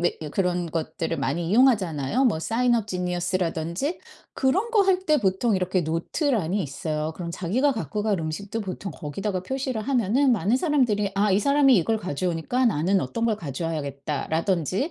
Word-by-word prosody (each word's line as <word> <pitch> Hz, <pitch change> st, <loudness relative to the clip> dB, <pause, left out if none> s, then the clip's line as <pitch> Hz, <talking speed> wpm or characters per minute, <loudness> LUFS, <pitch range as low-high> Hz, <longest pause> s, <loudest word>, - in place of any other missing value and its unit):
왜 175 Hz, -, 0 dB
예 155 Hz, -, -5 dB
그런 180 Hz, 0 st, 0 dB
것들을 165 Hz, +1 st, -3 dB
많이 145 Hz, +5 st, -1 dB
이용하잖아요. 210 Hz, -, +3 dB
뭐 210 Hz, -10 st, +2 dB
사인업 230 Hz, +2 st, +1 dB
지니어스라든지 180 Hz, -, -2 dB, 0.3 s
그런 385 Hz, -, +1 dB
거 425 Hz, -, +5 dB
할 380 Hz, -2 st, +3 dB
때 305 Hz, -1 st, +4 dB
보통 200 Hz, +3 st, +1 dB
이렇게 185 Hz, -1 st, 0 dB
노트란이 185 Hz, -, -1 dB
있어요. 155 Hz, +2 st, -3 dB
그럼 170 Hz, -1 st, -5 dB
자기가 220 Hz, +12 st, +1 dB
갖고 215 Hz, -2 st, -3 dB
갈 210 Hz, -3 st, +1 dB
음식도 195 Hz, +8 st, -4 dB
보통 195 Hz, 0 st, -5 dB
거기다가 185 Hz, +6 st, -4 dB
표시를 260 Hz, -2 st, -3 dB
하면은 255 Hz, +1 st, +2 dB
많은 215 Hz, +2 st, +2 dB
사람들이 245 Hz, -, +1 dB
아 200 Hz, +1 st, +2 dB
'이 190 Hz, -, +4 dB
사람이 280 Hz, +2 st, +4 dB
이걸 220 Hz, +5 st, +2 dB
가져오니까 180 Hz, -, -1 dB
나는 190 Hz, -1 st, +2 dB
어떤 230 Hz, -, -3 dB
걸 220 Hz, -3 st, +1 dB
가져와야겠다.'라든지 160 Hz, -, -2 dB
195 Hz, 395 characters per minute, -25 LUFS, 165-240 Hz, 0.3 s, 거